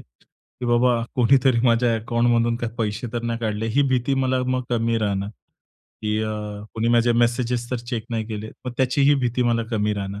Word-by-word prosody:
की - - -15
बाबा 120 0 +3
कोणीतरी 125 0 +4
माझ्या 115 0 +3
अकाउंटमधून 115 +1 +1
काही 115 -1 -4
पैसे 110 +1 -2
तर 120 -1 -3
नाही 115 0 -2
काढले 110 -1 -2
ही 145 - +5
भीती 130 +1 +1
मला 130 -1 +1
मग 130 0 0
कमी 115 -1 +1
राहणार, 100 -2 -1 0.7
की 105 0 0
अ, 110 0 -2 0.4
कोणी 115 +1 0
माझे 120 0 +4
मेसेजेस 120 0 0
तर 125 - 0
चेक 115 -4 -3
नाही 110 -2 -2
केले, 110 0 -6 0.2
मग 125 - -3
त्याचीही 140 +2 +3
भीती 125 +1 0
मला 120 -1 +1
कमी 105 -2 0
राहणार. 100 0 -5
115 Hz, 180 wpm, -23 LUFS, 110-125 Hz, 0.7 s, ही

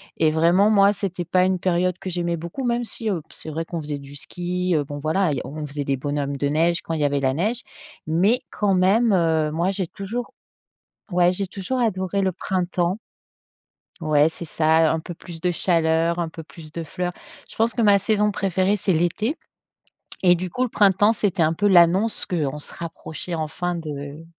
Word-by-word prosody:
et 160 -1 +3
vraiment 170 +6 +4
moi 200 -1 +5
c'était 190 -3 -4
pas 180 +2 +3
une 185 0 +1
période 180 0 0
que 190 - -5
j'aimais 170 -1 -1
beaucoup 170 +11 -6
même 240 -1 0
si 225 -1 -4
heu, 180 -6 -1
c'est - - -8
vrai 160 +2 -3
qu'on 165 0 -5
faisait 145 -1 -4
du 140 0 -11
ski, 180 +3 -2
bon 145 0 -6
voilà 160 +4 +1
on 150 +1 -6
faisait 145 0 -4
des 140 -1 -1
bonhommes 140 0 -2
de 145 - 0
neige 165 +4 +1
quand 165 - -4
il 160 - -2
y - - +3
avait 145 0 +1
la 135 -1 +1
neige, 215 - -1 0.4
mais 190 +10 +3
quand 200 -2 +1
même, 205 +6 +3
heu, 160 -4 +2
moi 170 +4 0
j'ai 190 -2 -2
toujours 220 +7 -5 0.8
ouais 180 0 +3
j'ai 195 +1 -3
toujours 195 +7 -3
adoré 195 -4 0
le 190 -1 +1
printemps 180 +1 -1 1.0
ouais 150 0 +4
c'est 160 +1 -8
ça, 160 0 +3
un 160 - -1
peu 175 +2 -8
plus 165 0 -11
de 180 +1 +1
chaleur, 165 -1 +1
un 170 -1 -1
peu 160 0 -9
plus 160 0 -13
de 165 +1 -5
fleurs. 180 +3 -4 0.3
Je - - -14
pense 225 +1 +2
que 235 - -3
ma 205 -2 +5
saison 210 +1 +1
préférée, 190 0 +1
c'est 200 -1 0
l'été 175 - 0 0.9
et 180 -1 +7
du 180 +1 -3
coup 250 +9 -1
le 250 - -1
printemps 205 +1 +4
c'était 195 -5 0
un 155 +1 +2
peu 205 +5 +1
l'annonce 185 +4 +4
qu'on 150 -6 -2
se 150 - -8
rapprochait 170 0 -6
enfin 165 +3 -3
de 150 -1 -6
175 Hz, 200 wpm, -23 LUFS, 160-195 Hz, 1.0 s, et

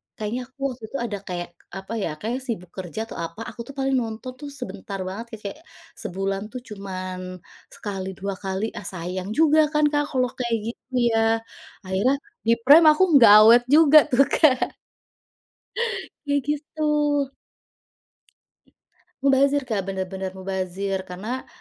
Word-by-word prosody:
kayaknya 235 +4 -4
aku 265 +1 -39
waktu 245 -2 -12
itu - - -10
ada 205 -3 -4
kayak, 175 -1 -4 0.2
apa 195 +3 -7
ya, 195 - -1
kayaknya 235 +7 -2
sibuk 180 -7 -5
kerja, 190 +4 -5
atau - - -9
apa, 170 +6 -5
aku - - -8
tuh 280 - -10
paling 270 0 +1
nonton 230 +2 -5
tuh 290 - -7
sebentar 250 -6 -7
banget, 200 +5 -5
ka - - -12
kayak - - -14 0.4
sebulan 195 -1 -2
tuh 255 - -6
cuman 185 -3 -6 0.2
sekali, 190 -2 -6
dua 200 0 -3
kali, 195 +3 -3
ah - - -11
sayang 185 +1 -5
juga 310 0 +5
kan 300 0 +2
Kak 290 -1 +2
kalau 255 -1 +2
kayak 235 -2 0
gitu, 255 +2 -13 0.2
ya? 225 0 +2 0.4
Akhirnya, 195 +8 +1 0.3
di 230 - +6
Prime 310 +5 +8
aku 305 +5 +3 0.2
nggak 230 -4 +9
awet 235 +2 +7
juga 305 +1 +8
tuh, 255 +2 +6
Kak. 270 -5 +3 1.5
Iya, 285 0 +1
gitu. 300 +1 -3 2.4
Mubazir, 275 +1 +3
Kak, 215 -7 -3
bener 190 -1 -3
bener 190 -1 -5
mubazir. 190 +1 -3
Karena, 215 +9 -5
220 Hz, 150 wpm, -24 LUFS, 190-260 Hz, 2.4 s, nggak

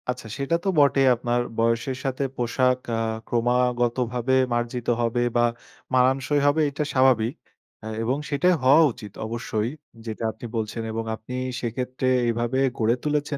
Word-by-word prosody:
আচ্ছা 125 -2 -3
সেটা 140 +4 0
তো - - -3
বটেই 140 -1 +4
আপনার 120 0 0 0.2
বয়সের 115 +3 0
সাথে 135 +1 -1
পোশাক 125 +1 +1 0.2
আ - - -1 0.3
ক্রমাগত 120 0 +1 0.2
ভাবে 125 +1 0 0.2
মার্জিত 120 0 -2
হবে 120 +1 0
বা 120 - +4 0.5
মানানসই 130 +3 +3
হবে 150 +2 +3
এটা 145 +2 -3
স্বাভাবিক। 130 -1 +3 0.5
এ - - -5 0.2
এবং 125 +4 0
সেটাই 155 +6 +3
হওয়া 140 +5 +7
উচিত 105 -2 -10
অবশ্যই। 110 -1 -2 0.4
যেটা 110 0 -5
আপনি 110 +3 -11
বলছেন, 110 +1 -3
এবং 115 0 -3
আপনি 110 +3 -10 0.3
সেক্ষেত্রে 125 +2 -3 0.2
এইভাবে 120 +2 0 0.2
গড়ে 115 +1 +2
তুলেছেন 150 -1 -1
125 Hz, 150 wpm, -24 LUFS, 115-135 Hz, 0.5 s, হওয়া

